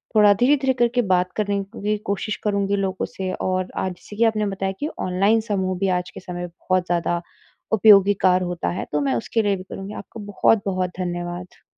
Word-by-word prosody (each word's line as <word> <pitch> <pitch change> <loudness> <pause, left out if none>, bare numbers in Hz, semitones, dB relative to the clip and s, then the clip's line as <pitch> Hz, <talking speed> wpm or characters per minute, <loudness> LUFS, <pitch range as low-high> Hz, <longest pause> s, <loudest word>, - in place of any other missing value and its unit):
थोड़ा 210 -1 +7
धीरे-धीरे 265 +5 +3
करके 245 0 +2
बात 180 0 +1
करने 205 -1 0
की 195 +4 -12
भी 210 +1 0
कोशिश 210 +2 -2
करूँगी 200 -1 +1
लोगों 190 -2 -1
से, 190 -1 -5
और 185 0 -1
आज 185 - -1
जैसे 195 +3 -13
कि 225 - +2
आपने 220 -2 +2
बताया 195 -1 -2
कि 295 - -1
ऑनलाइन 195 +5 +2
समूह 190 -2 0
भी 195 - +1
आज 180 0 -7
के - - -10
समय 175 -1 -6
पे 170 - -19 0.2
बहुत 185 -1 +3
ज़्यादा 175 -1 0 0.5
उपयोगिकार 195 -3 +5
होता 175 - -2
है, 85 - -3
तो 150 - 0
मैं 135 -2 +1
उसके 175 - 0
लिए 205 -2 +1
भी 185 - -8
करूँगी। 195 +2 -8
आपको 210 +3 -9
बहुत-बहुत 190 -4 +2
धन्यवाद। 175 0 -5
195 Hz, 200 wpm, -22 LUFS, 180-210 Hz, 0.5 s, थोड़ा